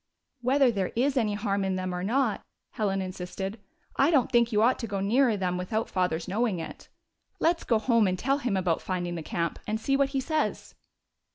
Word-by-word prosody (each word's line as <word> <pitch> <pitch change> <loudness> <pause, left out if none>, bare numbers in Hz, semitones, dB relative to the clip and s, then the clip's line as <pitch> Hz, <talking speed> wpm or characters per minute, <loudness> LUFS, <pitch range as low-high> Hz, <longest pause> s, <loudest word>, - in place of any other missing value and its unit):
" - - -55
Whether 260 +1 +4
there 195 -4 -2
is 265 +4 +1
any 215 -5 +1
harm 200 -1 -1
in 190 -1 0
them 185 -1 -3
or 180 0 -3
not," 235 +1 +1 0.3
Helen 195 -3 -1
insisted, 190 +3 -5 0.2
" - - -35
I 275 - +4
don't 275 -6 +3
think 235 -1 +3
you 210 0 +3
ought 250 +3 +3
to 230 - -4
go 200 -1 -3
nearer 225 +3 +3
them 180 -2 -1
without 215 +5 -2
father's 180 -3 0
knowing 210 0 0
it. 165 - -8 0.5
Let's 335 0 +2
go 230 - +2
home 225 -1 +3
and 185 0 0
tell 275 +7 +1
him 240 -8 -1
about 175 -3 0
finding 175 -2 -3
the 170 - -4
camp, 170 +2 -2
and 215 +1 -1
see 275 +5 +1
what 275 0 +2
he 275 -1 -1
says." 310 +4 -2
215 Hz, 215 wpm, -27 LUFS, 185-250 Hz, 0.5 s, Whether